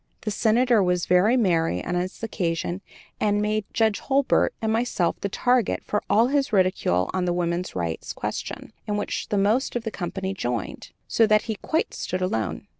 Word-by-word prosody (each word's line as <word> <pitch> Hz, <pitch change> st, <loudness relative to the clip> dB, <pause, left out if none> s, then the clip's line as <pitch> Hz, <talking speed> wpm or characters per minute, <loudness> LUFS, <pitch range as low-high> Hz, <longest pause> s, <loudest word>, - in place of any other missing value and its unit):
The 215 Hz, -, -3 dB
Senator 230 Hz, +2 st, +3 dB
was 180 Hz, -2 st, +1 dB
very 190 Hz, +8 st, +4 dB
merry 165 Hz, -, +1 dB
on -, -, -2 dB
that 180 Hz, +4 st, -3 dB
occasion 175 Hz, -3 st, -2 dB, 0.4 s
and 205 Hz, -1 st, +2 dB
made 210 Hz, 0 st, 0 dB
Judge 220 Hz, -2 st, +2 dB
Hurlbert 275 Hz, 0 st, +2 dB
and 220 Hz, -1 st, 0 dB
myself 225 Hz, -7 st, 0 dB
the 200 Hz, -, -1 dB
target 245 Hz, +1 st, +1 dB
for 210 Hz, -, -1 dB
all 215 Hz, +4 st, +5 dB
his 280 Hz, -2 st, +1 dB
ridicule 185 Hz, -, +2 dB
on 185 Hz, -1 st, 0 dB
the 175 Hz, -, +1 dB
woman's 175 Hz, +1 st, -2 dB
rights 85 Hz, -2 st, -3 dB
question, -, -, -5 dB
in 205 Hz, -1 st, -1 dB
which 205 Hz, -, -3 dB
the 205 Hz, -, 0 dB
most 215 Hz, +8 st, +1 dB
of 240 Hz, -, -1 dB
the 225 Hz, -, -3 dB
company 190 Hz, 0 st, -4 dB
joined, 120 Hz, -, -4 dB, 0.2 s
so 225 Hz, -, +3 dB
that 215 Hz, 0 st, +4 dB
we 220 Hz, -, 0 dB
stood 210 Hz, -, -13 dB
quite 320 Hz, -, -2 dB
alone. 145 Hz, -, -2 dB
200 Hz, 185 wpm, -24 LUFS, 180-225 Hz, 0.4 s, all